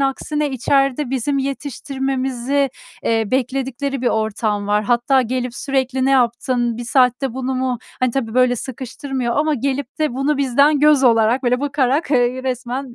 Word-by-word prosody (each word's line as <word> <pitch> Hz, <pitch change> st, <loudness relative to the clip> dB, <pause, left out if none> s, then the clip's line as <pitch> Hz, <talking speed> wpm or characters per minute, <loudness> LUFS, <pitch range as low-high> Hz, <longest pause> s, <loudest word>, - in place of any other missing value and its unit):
aksine 290 Hz, +2 st, -1 dB
içeride 275 Hz, +1 st, +1 dB
bizim 270 Hz, +2 st, 0 dB
yetiştirmemizi, 270 Hz, -1 st, -2 dB, 0.3 s
eee, 225 Hz, -1 st, +1 dB
bekledikleri 265 Hz, +1 st, -2 dB
bir -, -, 0 dB
ortam 215 Hz, -1 st, -1 dB
var. 210 Hz, +1 st, +1 dB
Hatta 245 Hz, +3 st, +2 dB
gelip 250 Hz, 0 st, -3 dB
sürekli 265 Hz, -1 st, -1 dB
ne 270 Hz, -, +2 dB
yaptın, 240 Hz, -2 st, +1 dB
1 240 Hz, -, -5 dB
saatte 250 Hz, 0 st, +2 dB
bunu 260 Hz, 0 st, -2 dB
mu 255 Hz, -2 st, -1 dB, 0.2 s
ha 255 Hz, -1 st, +2 dB
tabii, 230 Hz, -3 st, -3 dB
böyle, 250 Hz, -1 st, +3 dB
sıkıştırmıyor 260 Hz, 0 st, -4 dB
ama 305 Hz, 0 st, +2 dB
gelip 275 Hz, +2 st, -3 dB
de 305 Hz, -5 st, 0 dB
bunu 275 Hz, +2 st, 0 dB
bizden 280 Hz, +2 st, +3 dB
göz 295 Hz, -3 st, +5 dB
olarak, 230 Hz, +2 st, +3 dB
böyle 250 Hz, +1 st, +1 dB
bakarak, 285 Hz, +1 st, 0 dB
eee, 250 Hz, -1 st, +1 dB
resmen 255 Hz, 0 st, -4 dB
260 Hz, 155 wpm, -19 LUFS, 240-275 Hz, 0.3 s, göz